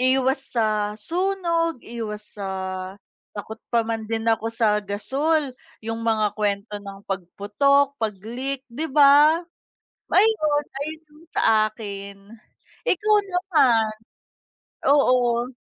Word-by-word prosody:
iwas 265 +1 +2 0.2
sa 210 -2 +1
sunog, 335 - 0
iwas 215 -3 -6
sa - - -3 0.9
takot 220 +2 -8
pa 235 - +4
man 225 -1 -3
din 225 +1 -3
ako 225 0 +1
sa 220 -2 +2
gasul 275 +7 0 0.3
yung 225 +1 -4
mga 215 -2 +1
kwento 205 0 -2
ng 200 -1 -9
pagputok, 210 +10 +1
pag-leak, 230 +6 -3
'di 285 +7 -4
ba? 295 +3 +6 0.7
Ayon, 310 -9 +3 0.2
ayon 310 +1 -9
sa - - 0 0.3
akin. 200 -2 -8 0.7
Ikaw 425 +4 +3
naman? 295 - +2 1.0
Oo. 250 -3 +3
240 Hz, 105 wpm, -23 LUFS, 215-295 Hz, 1.0 s, ba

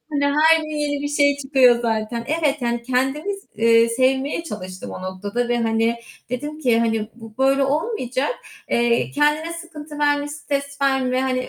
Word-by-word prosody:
Hani 285 -1 +1
her 305 +3 +5
gün 310 - -7
yeni 290 -1 -1
bir 290 - -2
şey 285 -1 +3
çıkıyor 265 -4 +4
zaten. 230 +1 -1
Evet, 305 -2 +1
yani 235 0 -1
kendimiz 275 +11 -1
eee, 230 +1 +5
sevmeye 265 +6 0
çalıştım 185 - -7
o - - -7
noktada 205 +6 -3
ve, 240 0 +1
hani, 225 +1 +1 0.3
dedim 295 +5 -4
ki, 240 -5 +3
hani, 225 -2 0
bu 225 -2 -12
böyle 270 +1 +3
olmayacak. 275 - -1 0.4
Eee, 235 0 +2
kendine 300 +3 +1
sıkıntı 315 -3 -9
verme, 290 0 +1
stres 285 -1 -4
verme. 260 -2 +2
Hani, 255 -1 -1
265 Hz, 160 wpm, -21 LUFS, 235-295 Hz, 0.4 s, her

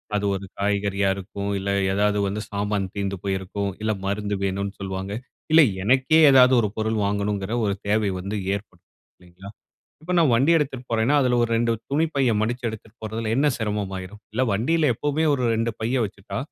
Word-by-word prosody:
அது 105 0 0
ஒரு 95 0 -6
காய்கறியா 100 -1 0
இருக்கும். 100 +1 -5
இல்ல 100 +1 -3 0.2
ஏதாவது 105 +1 +2
வந்து 105 +2 -3
சாமான் 100 -2 -2
தீர்ந்து 100 -1 -2
போயிருக்கும். 100 +1 -2
இல்ல 110 0 0
மருந்து 100 +1 -1
வேணுனு 100 +1 -2
சொல்வாங்க. 95 +1 -4 0.4
இல்ல 160 +1 +8 0.2
எனக்கே 130 +7 +4
ஏதாவது 130 -1 +7
ஒரு 105 - +1
பொருள் 110 0 0
வாங்கணும்ங்கிற 100 +1 -1
ஒரு 100 - +1
தேவை 105 -1 +2
வந்து 100 +3 -4 0.2
ஏற்படும். 100 +1 -10 0.3
இல்லேங்களா? 90 +2 -13 0.5
இப்ப 180 +3 -3
நான் 155 -7 +4
வண்டி 135 +8 +4
எடுத்துட்டுப்போறேன்னா 130 -3 0
அதில 125 -2 +2
ஒரு 115 - -1
2 115 0 +1 0.2
துணிப் 160 +2 +1
பைய 130 -4 +3
மடிச்சு 120 +3 -2
எடுத்துட்டு 110 +1 -8
போறதில்ல 110 0 -3
என்ன 145 +3 +3
சிரமம் 105 -3 -2
ஆயிரும்? 95 +3 -9
இல்ல 125 - 0
வண்டியில 150 +8 +2
எப்பவுமே 145 +6 -1
ஒரு 130 -3 -1
2 115 +1 0
பைய 115 +4 -1
வச்சுட்டா, 100 0 -7
105 Hz, 170 wpm, -24 LUFS, 100-125 Hz, 0.5 s, இல்ல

